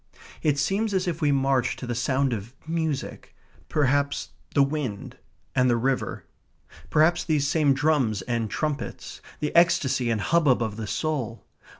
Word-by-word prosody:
It 150 -2 +2
seems 195 +8 0
as 185 0 0
if 170 -2 -2
we 145 -2 +3
marched 135 -2 +1
to - - -6
the 120 - -2
sound 130 +2 +1
of 115 +3 -6
music; 160 -4 -3 0.3
perhaps 140 - +1 0.3
the 140 - +6
wind 135 -8 -4 0.3
and 125 0 +3
the 120 - +3
river; 130 +2 -1 0.6
perhaps 160 +3 +3
these 150 -3 +1
same 145 -2 +3
drums 135 -9 +1
and 115 -1 -2
trumpets 150 +2 -4 0.2
the 150 - -2
ecstasy 135 -7 +3
and 115 -2 +1
hubbub 145 -2 +3
of 110 -2 -3
the 110 -1 -5
soul. 130 -5 -3
140 Hz, 155 wpm, -25 LUFS, 120-155 Hz, 0.6 s, the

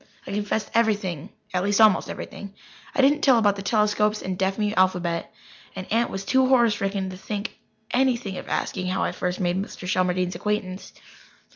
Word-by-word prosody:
I - - -7
confessed 210 +1 -2
everything 205 -9 0 0.2
at 180 0 +1
least, 205 +1 +1
almost 215 -3 +5
everything. 200 0 -8 0.4
I 275 - +3
didn't 290 +2 +4
tell 260 -4 +5
about 205 -3 +3
the 200 - -6
telescopes 210 0 +1
and 185 0 -3
deaf 190 +1 0
mute 210 -1 0
alphabet, 180 -2 +1 0.4
and 185 - -5
Aunt 235 +1 +2
was 195 0 -5
too 260 +3 +3
horror 240 -3 +5
stricken 195 -2 -2
to 185 - -8
think 205 +2 -5 0.3
of 245 -6 0
asking 185 -2 -2
how 185 - 0
I - - 0
first 180 0 -3
made 180 +1 0
Mr. 195 -2 -7
Shelmardine's 185 -1 +1
acquaintance. 205 -3 -3
200 Hz, 175 wpm, -24 LUFS, 185-215 Hz, 0.4 s, almost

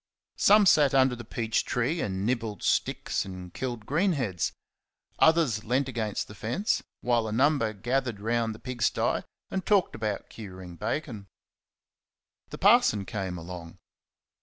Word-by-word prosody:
Some 210 +1 +6
sat 145 -6 +5
under 130 -1 +4
the 120 - -8
peach 115 -1 -1
tree 130 +7 -1
and 95 0 -2
nibbled 115 -3 -2
sticks - - 0
and 90 -2 -9
killed 120 -5 -4
green 180 - +2
heads; 95 - -1 0.7
others 160 -10 +4
leant 125 +4 +1
against 110 -5 -3
the - - -11
fence; 120 - -1 0.2
while 120 -2 +1
a - - -4
number 130 -1 +2
gathered 120 +1 -2
round 115 +1 -1
the - - -10
pig 125 -1 -7
sty 105 - +1 0.3
and 190 - -2
talked 200 -2 +2
about 105 -2 -3
curing 95 -5 -9
bacon. 110 - -4 1.2
The - - -7
parson 100 -2 +4
came 95 -3 -4
along. 85 0 -9
115 Hz, 145 wpm, -28 LUFS, 100-135 Hz, 1.2 s, Some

